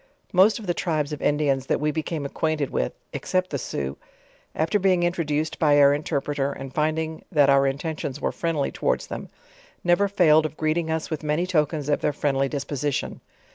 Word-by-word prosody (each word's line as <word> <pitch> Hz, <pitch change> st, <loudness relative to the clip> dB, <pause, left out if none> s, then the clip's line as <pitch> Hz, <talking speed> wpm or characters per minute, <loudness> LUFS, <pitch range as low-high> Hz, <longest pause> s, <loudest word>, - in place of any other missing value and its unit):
Most 190 Hz, +4 st, +5 dB
of 220 Hz, -, -8 dB
the 175 Hz, -, 0 dB
tribes 155 Hz, -4 st, -1 dB
of 150 Hz, -, -6 dB
Indians 140 Hz, -3 st, +1 dB
that -, -, +1 dB
we 150 Hz, +1 st, +1 dB
became 160 Hz, -1 st, -3 dB
acquainted 150 Hz, 0 st, -1 dB
with 60 Hz, -, -1 dB, 0.2 s
(except 185 Hz, 0 st, -1 dB
the -, -, -2 dB
Sioux) -, -, -4 dB, 0.6 s
after 210 Hz, -, +1 dB
being 185 Hz, -2 st, +3 dB
introduced 160 Hz, -3 st, -1 dB
by 145 Hz, -2 st, +4 dB
our 140 Hz, 0 st, +7 dB
inter 145 Hz, 0 st, -1 dB
preter, 140 Hz, -1 st, -2 dB
and 135 Hz, -1 st, -8 dB
finding 155 Hz, +1 st, -1 dB
that 145 Hz, -5 st, +5 dB
our 140 Hz, 0 st, +4 dB
intentions 145 Hz, 0 st, -3 dB
were -, -, -1 dB
friendly 165 Hz, -4 st, -1 dB
towards -, -, -1 dB
them, -, -, -7 dB, 0.5 s
never 175 Hz, +3 st, +3 dB
failed 160 Hz, -6 st, +4 dB
of 155 Hz, -, -15 dB
greeting 160 Hz, +1 st, 0 dB
us 160 Hz, +1 st, -2 dB
with 155 Hz, -, -2 dB
many 155 Hz, +3 st, 0 dB
tokens 155 Hz, -4 st, 0 dB
of 145 Hz, -, +1 dB
their 150 Hz, -, +1 dB
friendly 135 Hz, -1 st, 0 dB
disposition. 145 Hz, 0 st, -3 dB
150 Hz, 185 wpm, -24 LUFS, 145-165 Hz, 0.6 s, our